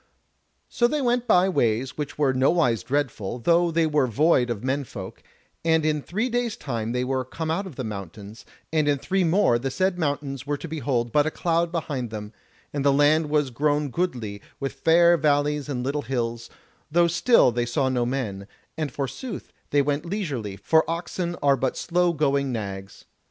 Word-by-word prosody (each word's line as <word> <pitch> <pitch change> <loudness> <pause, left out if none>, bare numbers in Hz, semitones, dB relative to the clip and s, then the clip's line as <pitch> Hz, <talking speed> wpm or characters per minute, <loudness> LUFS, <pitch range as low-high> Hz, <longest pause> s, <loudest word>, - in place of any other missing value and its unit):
So 240 - +2
they 300 +5 -1
went 245 -2 +1
by 180 +1 +5
ways 125 - 0
which 150 -2 -5
were 140 -3 +2
nowise 130 - +2
dreadful, 125 -3 -2
though 170 +7 +3
they 165 0 +2
were 150 -4 +2
void 125 +1 +3
of 115 -2 -3
men 135 +2 0
folk, 95 -6 -9 0.4
and 160 -1 +2
in 150 -1 +1
three 215 - -2
days' 245 -2 -1
time 115 -4 -3
they 125 +1 0
were 130 0 -1
come 160 +5 -4
out 190 +4 -1
of 165 - -10
the 130 - -4
mountains, 105 0 -8 0.3
and 155 -2 +2
in 145 -1 +3
three 190 +7 0
more 165 -8 +3
the 135 +2 -2
said 185 +5 0
mountains 145 -3 -2
were 145 0 -1
to 165 - -7
behold 135 -7 -1
but 150 +3 +3
a - - +2
cloud 170 +1 0
behind 145 -8 -3
them, 105 0 -7 0.4
and 145 -2 -1
the 140 - +4
land 150 +2 +3
was 145 -3 +1
grown 145 +2 0
goodly, 120 - -3 0.2
with 135 -1 -3
fair 170 +4 +4
valleys 145 -1 +1
and 125 -3 -2
little 140 +3 -1
hills, 120 -3 -3 0.4
though 170 +2 +4
still 170 - +4
they 120 +1 -1
saw 130 +3 0
no 125 -2 +1
men, 115 -6 -3 0.3
and 155 -4 -3
forsooth 145 - -5 0.2
they 145 -1 +3
went 145 +1 -1
leisurely, 145 - -3
for 160 - +3
oxen 175 +1 -3
are 140 -1 +5
but 130 0 -2
slow 175 0 +1
going 140 -3 +1
nags. 100 -4 -6
145 Hz, 190 wpm, -25 LUFS, 125-165 Hz, 0.4 s, by